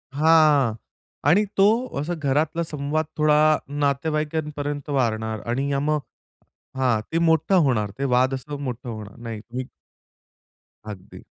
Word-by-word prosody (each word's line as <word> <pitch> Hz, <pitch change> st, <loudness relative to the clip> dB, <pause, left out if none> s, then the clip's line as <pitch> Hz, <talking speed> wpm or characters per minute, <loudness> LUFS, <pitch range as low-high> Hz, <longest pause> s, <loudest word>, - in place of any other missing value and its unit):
हां. 150 Hz, -5 st, +4 dB, 0.6 s
आणि 195 Hz, +7 st, +5 dB
तो 195 Hz, -, +6 dB, 0.3 s
असा 160 Hz, +5 st, -2 dB
घरातला 155 Hz, +3 st, 0 dB
संवाद 155 Hz, 0 st, -2 dB
थोडा 150 Hz, -1 st, +4 dB, 0.4 s
नातेवाईकांपर्यंत 150 Hz, 0 st, -2 dB
वाढणार 110 Hz, -5 st, -1 dB
आणि 135 Hz, +4 st, -1 dB
अ, 140 Hz, -, +1 dB
मग 150 Hz, +1 st, +1 dB, 0.8 s
हां. 125 Hz, -4 st, +2 dB
ते 165 Hz, -, 0 dB
मोठा 165 Hz, +3 st, +3 dB
होणार, 125 Hz, -, +2 dB
ते -, -, -1 dB
वाद 130 Hz, +2 st, +3 dB
असं 145 Hz, +2 st, -5 dB
मोठं 125 Hz, -1 st, -5 dB
होणार 105 Hz, -3 st, -8 dB
नाही. 115 Hz, +2 st, -6 dB, 1.2 s
अगदी. 100 Hz, -4 st, -10 dB
140 Hz, 120 wpm, -23 LUFS, 125-155 Hz, 1.2 s, तो